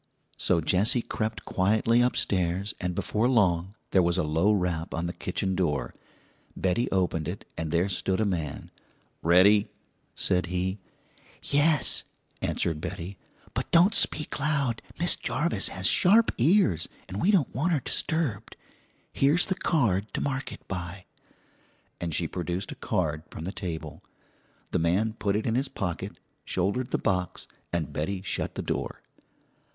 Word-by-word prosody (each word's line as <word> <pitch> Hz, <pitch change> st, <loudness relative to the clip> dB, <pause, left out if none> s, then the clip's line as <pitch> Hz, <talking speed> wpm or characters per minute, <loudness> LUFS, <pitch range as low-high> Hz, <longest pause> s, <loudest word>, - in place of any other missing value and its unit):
So 85 Hz, -2 st, +1 dB
Jessie 100 Hz, +9 st, +2 dB
crept 110 Hz, 0 st, -3 dB
quietly 110 Hz, +5 st, +2 dB
upstairs, 95 Hz, -5 st, +1 dB
and 90 Hz, -1 st, -2 dB
before 110 Hz, +7 st, 0 dB
long 95 Hz, -5 st, +2 dB, 0.2 s
there 95 Hz, -, +5 dB
was 85 Hz, 0 st, +2 dB
a 90 Hz, -, +2 dB
low 80 Hz, +7 st, +2 dB
rap 90 Hz, -5 st, -1 dB
on 85 Hz, +1 st, -2 dB
the 85 Hz, -, -3 dB
kitchen 95 Hz, -1 st, -2 dB
door. 85 Hz, -6 st, -1 dB, 0.6 s
Betty 95 Hz, +7 st, 0 dB
opened 85 Hz, -5 st, 0 dB
it, 90 Hz, +3 st, -6 dB
and 80 Hz, -1 st, -3 dB
there 85 Hz, +4 st, +2 dB
stood 95 Hz, 0 st, 0 dB
a 110 Hz, -, +2 dB
man. 85 Hz, -7 st, -3 dB, 0.5 s
"Ready?" 100 Hz, +5 st, +5 dB, 0.5 s
said 90 Hz, -1 st, +1 dB
he. 90 Hz, +3 st, -2 dB, 0.6 s
"Yes," 145 Hz, 0 st, +3 dB, 0.4 s
answered 80 Hz, -2 st, 0 dB
Betty; 90 Hz, +1 st, -6 dB, 0.3 s
"but -, -, -3 dB
don't 175 Hz, +5 st, +5 dB
speak 150 Hz, -6 st, +2 dB
loud; 140 Hz, -5 st, 0 dB, 0.2 s
Miss 175 Hz, +2 st, +5 dB
Jarvis 150 Hz, -11 st, +1 dB
has 95 Hz, +1 st, -4 dB
sharp 205 Hz, -, +5 dB
ears, 130 Hz, -, +3 dB, 0.2 s
'n' 95 Hz, +2 st, -5 dB
we 185 Hz, -, +2 dB
don't 185 Hz, -, +3 dB
want 155 Hz, +9 st, 0 dB
her 155 Hz, -, +2 dB
disturbed. 130 Hz, -8 st, 0 dB, 0.6 s
Here's 145 Hz, +6 st, +4 dB
the 190 Hz, -, 0 dB
card 110 Hz, -, 0 dB
to -, -, -1 dB
mark 135 Hz, -1 st, -2 dB
it -, -, -11 dB
by," 90 Hz, 0 st, -5 dB, 0.9 s
and 85 Hz, -1 st, -3 dB
she 85 Hz, +1 st, 0 dB
produced 90 Hz, +3 st, -4 dB
a -, -, -6 dB
card 80 Hz, -7 st, -1 dB
from -, -, -8 dB
the 90 Hz, -, -3 dB
table. 80 Hz, -7 st, -6 dB, 0.7 s
The -, -, +1 dB
man 95 Hz, +7 st, +1 dB
put 100 Hz, -3 st, -1 dB
it 110 Hz, -, -1 dB
in 115 Hz, -, 0 dB
his 135 Hz, +3 st, 0 dB
pocket, 90 Hz, -4 st, -4 dB, 0.2 s
shouldered 100 Hz, +8 st, -1 dB
the -, -, 0 dB
box, 90 Hz, -1 st, -1 dB, 0.3 s
and 85 Hz, -4 st, -2 dB
Betty 95 Hz, +5 st, -3 dB
shut -, -, -2 dB
the -, -, -3 dB
door. -, -, -4 dB
95 Hz, 155 wpm, -27 LUFS, 85-120 Hz, 0.9 s, there